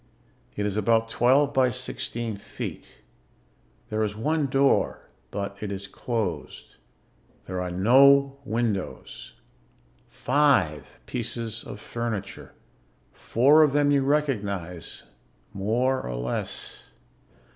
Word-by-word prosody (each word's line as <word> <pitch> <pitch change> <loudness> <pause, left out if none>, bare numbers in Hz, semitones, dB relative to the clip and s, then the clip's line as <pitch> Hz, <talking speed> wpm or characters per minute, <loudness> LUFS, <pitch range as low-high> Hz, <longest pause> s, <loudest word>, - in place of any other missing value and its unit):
It 105 - -2
is 105 0 -2
about 115 +2 +2
twelve 140 +5 +3
by 130 -2 +4
sixteen 120 -2 -3
feet. 100 - -8 0.9
There 110 0 0
is 105 -1 -1
one 150 +6 0
door, 135 +1 +1 0.2
but 100 0 -4
it 105 -2 -4
is 100 0 -5
closed. 95 - -4 0.7
There 90 0 -4
are 90 - -3
no 135 +9 +5
windows. 115 -5 -3 0.7
Five 125 - +1
pieces 115 -2 -4
of - - -9
furniture. 110 -4 -5 0.6
Four 140 +7 +4
of 150 -3 +4
them 145 0 +3
you 140 -1 +3
recognize 100 - -2 0.5
more 120 +7 0
or 60 - -5
less. - - -5
115 Hz, 105 wpm, -26 LUFS, 100-135 Hz, 0.9 s, no